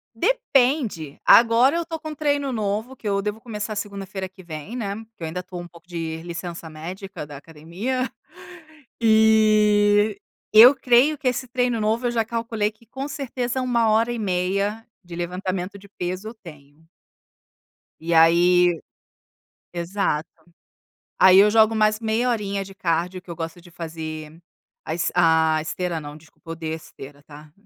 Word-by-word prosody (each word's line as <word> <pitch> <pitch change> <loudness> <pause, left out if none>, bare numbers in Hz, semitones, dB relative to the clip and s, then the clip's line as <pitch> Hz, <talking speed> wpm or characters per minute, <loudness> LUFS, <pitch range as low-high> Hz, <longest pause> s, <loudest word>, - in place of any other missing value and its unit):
Depende, 265 - +1
agora 240 +6 +6
eu 340 - -2
tô 325 - -5
com 310 0 -8
um 305 - -7
treino 285 -2 0
novo 220 +3 -3
que 220 - -7
eu 200 -1 +1
devo 210 +2 -4
começar 215 -2 -5
segunda-feira 195 -2 -5
que 185 0 -16
vem, 160 +6 -8
né, 205 -5 -3 0.2
que 170 - -11
eu - - -1
ainda 165 +3 -4
estou 180 -1 -7
um 175 - -9
pouco 170 0 -18
de 165 -2 -5
licença 170 -1 -7
médica 180 +3 -8
da 145 -1 -10
academia, 170 - -4 0.9
e 215 -2 +4 0.3
eu 240 +6 +9
creio 255 +4 +3
que 275 -2 -3
esse 255 +1 -3
treino 245 -1 0
novo, 225 +3 0
eu - - 0
já 230 -2 0
calculei 225 -2 -2
que 220 +2 -25
com 265 +5 -6
certeza 260 -3 -3
é - - -1
1 235 -3 +1
hora 225 +2 +2
e 240 - -4
meia 200 +3 -1 0.2
de 175 -1 -10
levantamento 185 +2 -4
de 200 - -16
peso 185 +2 -5
eu - - -10
tenho. 150 -2 -14 1.1
E 170 +1 -2
aí, 175 +2 +5 1.0
exato 170 -3 -1 0.9
aí 190 0 +7
eu 205 +2 +7
jogo 220 0 +4
mais 215 0 +2
meia 225 +2 0
horinha 200 -4 -1
de 195 0 -12
cardio 180 -1 -2
que 180 - -14
eu 170 - -6
gosto 165 +1 -6
de 175 0 -17
fazer 160 -2 -7 0.5
a 160 - -3
es 165 -1 -1
a 160 -2 +4
esteira 170 0 -3
não, 145 0 -9
desculpa 160 +2 -16
odeio 160 -1 -4
a - - -3
esteira 145 -2 -13
tá, 150 +1 -14
200 Hz, 165 wpm, -23 LUFS, 170-230 Hz, 1.1 s, eu